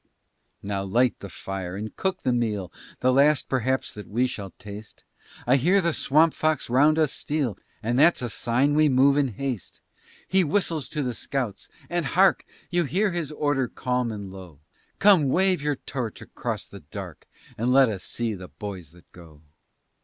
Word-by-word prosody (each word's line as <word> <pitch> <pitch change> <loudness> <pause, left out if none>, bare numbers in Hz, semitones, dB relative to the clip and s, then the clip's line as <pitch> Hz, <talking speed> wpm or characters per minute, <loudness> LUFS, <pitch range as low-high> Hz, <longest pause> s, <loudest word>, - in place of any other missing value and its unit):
Now 100 -1 -2
light 120 +6 +1
the 100 - -8
fire 95 -2 -6
and 105 +2 -6
cook 190 -1 -2
the 125 - +2
meal, 105 -6 -1 0.3
The 130 0 +3
last 140 +2 +4
perhaps 130 0 -1
that 105 - -9
we 120 +5 +1
shall 100 -6 -5
taste; 105 +1 -10 0.4
I 125 +3 +4
hear 180 +9 +3
the 170 -3 +1
Swamp 155 +3 +3
Fox 155 -5 0
round 150 +5 +4
us 155 -4 +2
steal, 145 -8 -2 0.3
And 120 +3 +1
that's 160 -3 +5
a 120 - -2
sign 130 +7 +1
we 155 0 +4
move 135 +1 +4
in 145 -1 +2
haste. 125 -5 -5 0.5
He 190 0 +3
whistles 165 -2 0
to 150 -2 -2
the 125 -2 -2
scouts, 125 -3 -4 0.2
and 175 -4 -1
hark! 190 +8 +3 0.3
You 175 -1 +2
hear 195 +7 +1
his 170 -4 -3
order 145 -4 0
calm 125 -1 -2
and 100 -3 -7
low. 90 -6 -11 0.4
Come, 195 -9 +5
wave 185 +2 +2
your 145 0 0
torch 125 -4 -5
across - - -5
the - - -11
dark, - - -9 0.3
And 120 +3 0
let 135 0 +6
us 100 -5 -4
see 115 -2 -3
the 90 -2 -8
boys 95 -7 -8
that 90 -1 -19
go. 80 -3 -15
130 Hz, 180 wpm, -25 LUFS, 105-150 Hz, 0.5 s, let